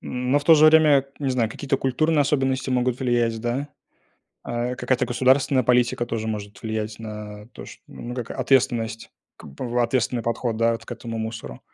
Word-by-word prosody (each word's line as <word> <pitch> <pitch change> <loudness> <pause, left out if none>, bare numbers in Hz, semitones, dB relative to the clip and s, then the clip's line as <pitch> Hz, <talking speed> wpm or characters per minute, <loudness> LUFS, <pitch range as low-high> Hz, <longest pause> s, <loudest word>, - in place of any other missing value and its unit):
Но 125 +3 -1
в 145 - -8
то 165 +1 +7
же 155 0 +6
время, 155 -1 +6 0.3
я 140 - -4
не - - +1
знаю, 120 -3 +1
какие-то 135 +2 -2
культурные 145 +4 +1
особенности 135 -2 0
могут 125 0 0
влиять, 120 -3 0
да. 125 +5 -2 0.7
А, 120 +1 -3
какая-то 125 0 0
государственная 130 +2 +2
политика 120 0 +2
тоже 110 -1 -3
может 105 -1 -6
влиять 110 -1 -4
на 105 -1 -8
то - - -11
что, - - -13
ну, 120 +1 -8
как 120 -3 -6
ответственность, 120 -3 0 0.3
как - - -13
бы, 125 - -5
в 120 +1 -1
ответственный 120 0 0
подход, 115 0 -2
да, 115 0 +2
вот 115 - -6
к - - -7
этому 115 -1 -6
мусору. 110 - -6
120 Hz, 190 wpm, -23 LUFS, 115-130 Hz, 0.7 s, то